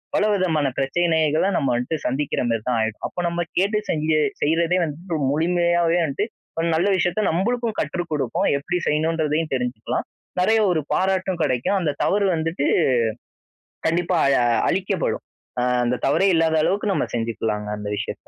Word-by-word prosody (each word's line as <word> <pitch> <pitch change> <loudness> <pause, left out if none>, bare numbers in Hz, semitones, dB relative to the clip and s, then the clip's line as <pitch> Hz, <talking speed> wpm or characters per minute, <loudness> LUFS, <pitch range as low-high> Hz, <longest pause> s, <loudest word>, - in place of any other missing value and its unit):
பல - - +3
விதமான 165 -7 +1
பிரச்சனைகள 160 +2 +1
நம்ம 135 - 0
வன்ட்டு 125 +6 -1
சந்திக்கிற 135 +3 -1
மாதிரி 115 -1 0
தான் 125 -2 +1
ஆயிடும். 110 -1 -3
அப்போ - - -8
நம்ம 170 0 -3 0.2
கேட்டு 200 +4 +2
செஞ்சு 155 0 +1 0.2
செய்றதே 165 +3 +2
வந்துட்டு 165 +3 -4 0.2
முழுமையாவே 170 +2 +2
வந்ட்டு 155 +7 -1 0.3
ஒரு 165 - +1
நல்ல 175 +5 +2
விஷயத்த 180 +4 0
நம்பளுக்கும் 230 +6 -1
கற்று 175 - -2
குடுக்கும், 150 -2 0
எப்டி 175 +5 -2
செய்யணுன்றதையும் 155 0 0
தெரிஞ்சுக்கலாம். 125 -3 -3 0.3
நிறைய 220 +5 +3
ஒரு 165 - +1
பாராட்டும் 190 -1 0
கிடைக்கும். 130 +7 0
அந்த 165 -5 0
தவறு 200 0 +2
வந்துட்டு 160 -2 -1 1.2
கண்டிப்பா 170 +2 +1 0.2
அ - - +3 0.2
அழிக்கப்படும். 190 0 -1 0.4
ஆ - - +1 0.2
அந்த 120 +1 +1
தவறே 160 +8 +3
இல்லாத 160 0 +2
அளவுக்கு 205 +3 +1
நம்ம - - 0
செஞ்சுக்கலாங்க 110 -2 -2
அந்த 105 0 -6
விஷயத்த. - - -6
165 Hz, 150 wpm, -22 LUFS, 145-180 Hz, 1.2 s, பல